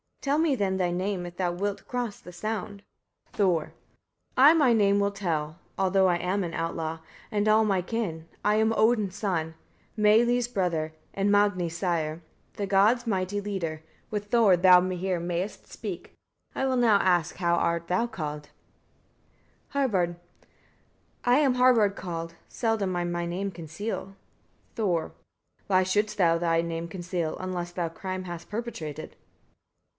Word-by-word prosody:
Tell 280 Hz, +1 st, +1 dB
me 320 Hz, -4 st, +3 dB
then 195 Hz, -5 st, 0 dB
thy 180 Hz, -2 st, +1 dB
name, 185 Hz, 0 st, -2 dB
if 175 Hz, 0 st, -11 dB
thou 180 Hz, -2 st, 0 dB
wilt 200 Hz, +3 st, -3 dB
cross 245 Hz, -4 st, -3 dB
the 180 Hz, -, -12 dB
sound. 205 Hz, +1 st, -4 dB, 0.5 s
Thor. 180 Hz, -6 st, +1 dB, 0.6 s
9. 265 Hz, +2 st, +8 dB
I -, -, +5 dB
my 285 Hz, -7 st, +4 dB
name 200 Hz, -2 st, +3 dB
will 200 Hz, 0 st, +1 dB
tell, 165 Hz, -6 st, -3 dB, 0.2 s
(although 190 Hz, 0 st, +3 dB
I 175 Hz, -1 st, +2 dB
am 185 Hz, +3 st, -1 dB
an 170 Hz, -1 st, -4 dB
outlaw) 165 Hz, -1 st, -3 dB, 0.3 s
and 210 Hz, -1 st, 0 dB
all 215 Hz, +1 st, +5 dB
my 195 Hz, -3 st, +1 dB
kin: 180 Hz, -6 st, -4 dB, 0.2 s
I 210 Hz, 0 st, +4 dB
am 220 Hz, +1 st, +3 dB
Odin's 215 Hz, -4 st, +2 dB
son, 165 Hz, -6 st, -2 dB, 0.4 s
Meili's 235 Hz, +3 st, +4 dB
brother, 175 Hz, -8 st, -1 dB, 0.2 s
and 200 Hz, +1 st, +1 dB
Magni's 185 Hz, -5 st, +2 dB
sire, 170 Hz, -3 st, -1 dB, 0.3 s
the 200 Hz, -, -3 dB
gods' 210 Hz, +5 st, +3 dB
mighty 195 Hz, -1 st, -1 dB
leader: 170 Hz, -6 st, -4 dB, 0.3 s
With 205 Hz, -1 st, -2 dB
Thor 205 Hz, -4 st, +4 dB
thou 180 Hz, 0 st, +7 dB
here 185 Hz, 0 st, -1 dB
mayest 175 Hz, +3 st, -4 dB
speak. -, -, -7 dB, 0.4 s
I 265 Hz, -, 0 dB
will 260 Hz, -1 st, +1 dB
now 230 Hz, -4 st, +5 dB
ask 175 Hz, -3 st, +2 dB
how 170 Hz, -2 st, +2 dB, 0.2 s
thou 175 Hz, +2 st, -1 dB
art 240 Hz, 0 st, -2 dB
called. 150 Hz, -3 st, -5 dB, 1.2 s
Harbard. 195 Hz, -11 st, 0 dB, 1.1 s
10. 245 Hz, -, +4 dB
I -, -, +5 dB
am 270 Hz, -4 st, +3 dB
Harbard 240 Hz, -5 st, +4 dB
called; 165 Hz, -3 st, -5 dB
seldom 220 Hz, -5 st, -1 dB
I 175 Hz, -, 0 dB
my 175 Hz, 0 st, -2 dB
name 190 Hz, +3 st, -2 dB
conceal. 185 Hz, +4 st, -6 dB, 0.6 s
Thor. 190 Hz, -7 st, +1 dB
11. 160 Hz, -, -9 dB, 0.5 s
Why 185 Hz, -1 st, +4 dB
shouldst 210 Hz, +3 st, 0 dB
thou 170 Hz, -3 st, +4 dB
thy 165 Hz, -1 st, +2 dB
name 165 Hz, 0 st, -4 dB
conceal, 175 Hz, -2 st, -3 dB
unless 180 Hz, -2 st, -4 dB
thou 175 Hz, -1 st, -2 dB
crime 185 Hz, +2 st, -5 dB
hast 175 Hz, -1 st, -7 dB
perpetrated? 210 Hz, -10 st, -6 dB
190 Hz, 155 wpm, -27 LUFS, 175-210 Hz, 1.2 s, 9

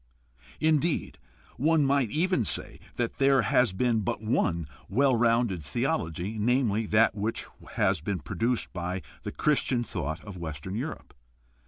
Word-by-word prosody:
Indeed, 155 Hz, +1 st, +1 dB, 0.4 s
one 155 Hz, +1 st, +3 dB
might 135 Hz, -4 st, +2 dB
even 165 Hz, -, +1 dB
say -, -, -2 dB, 0.2 s
that 120 Hz, -1 st, -2 dB
there 135 Hz, 0 st, +4 dB
never 135 Hz, -, +5 dB
has 125 Hz, -6 st, +4 dB
been 115 Hz, +4 st, +1 dB
but 100 Hz, -, -2 dB
one 90 Hz, -7 st, 0 dB, 0.2 s
well 130 Hz, +4 st, +3 dB
rounded 115 Hz, -5 st, +2 dB
theology, 85 Hz, +8 st, -2 dB
namely, 115 Hz, -2 st, +1 dB
that 110 Hz, 0 st, +4 dB
which 105 Hz, +3 st, -2 dB, 0.3 s
has 95 Hz, -4 st, +1 dB
been 95 Hz, +3 st, -2 dB
produced 115 Hz, -, -2 dB
by 90 Hz, +1 st, -3 dB, 0.2 s
the -, -, -5 dB
Chris 150 Hz, -2 st, +2 dB
tian 120 Hz, -2 st, 0 dB
thought 80 Hz, -7 st, -4 dB
of 100 Hz, -3 st, -8 dB
Western 80 Hz, +2 st, -5 dB
Europe. 130 Hz, +9 st, -5 dB
115 Hz, 150 wpm, -28 LUFS, 95-135 Hz, 0.4 s, never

